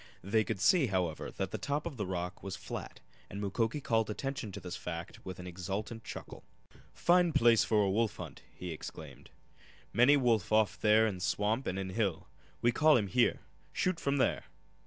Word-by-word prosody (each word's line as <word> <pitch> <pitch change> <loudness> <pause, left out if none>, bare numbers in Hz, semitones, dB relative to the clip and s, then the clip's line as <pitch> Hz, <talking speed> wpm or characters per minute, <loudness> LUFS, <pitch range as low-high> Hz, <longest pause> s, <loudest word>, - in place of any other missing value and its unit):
They 110 +4 +2
could 95 - -3
see, 170 - +4
however, 90 -5 -1
that 95 -1 -3
the - - -4
top 145 +2 -2
of 170 -4 -4
the, 105 -4 -2
rock 90 0 -4
was 95 -1 -5
flat, - - -7 0.3
and 100 - -6
Mukoki 110 +6 -1
called 115 -5 +1
attention 135 0 -4
to - - -6
this 90 -1 -6
fact 85 +1 -6
with 95 -1 -7
an 90 - -8
exultant 95 +6 -5
chuckle. - - -8 0.5
"Fine 175 -1 +3
place 115 -1 +5
for 105 -3 +2
wolf 115 +1 +1
hunt!" - - -8
he 90 -1 -7
exclaimed. 80 - -9 0.6
"Many 130 +5 +6
wolf 115 -8 +1
off 110 -1 +3
there 110 +1 +5
in 100 -4 -2
swamp 105 +7 0
an' 95 - -2
in 95 -1 -3
hill. 95 -5 -1 0.4
We 120 - +5
call 155 +5 +5
heem 105 -5 +1
here. 120 +6 +2 0.3
Shoot 185 -2 0
from 140 0 0
there!" 130 - +1
110 Hz, 185 wpm, -32 LUFS, 95-125 Hz, 0.6 s, Many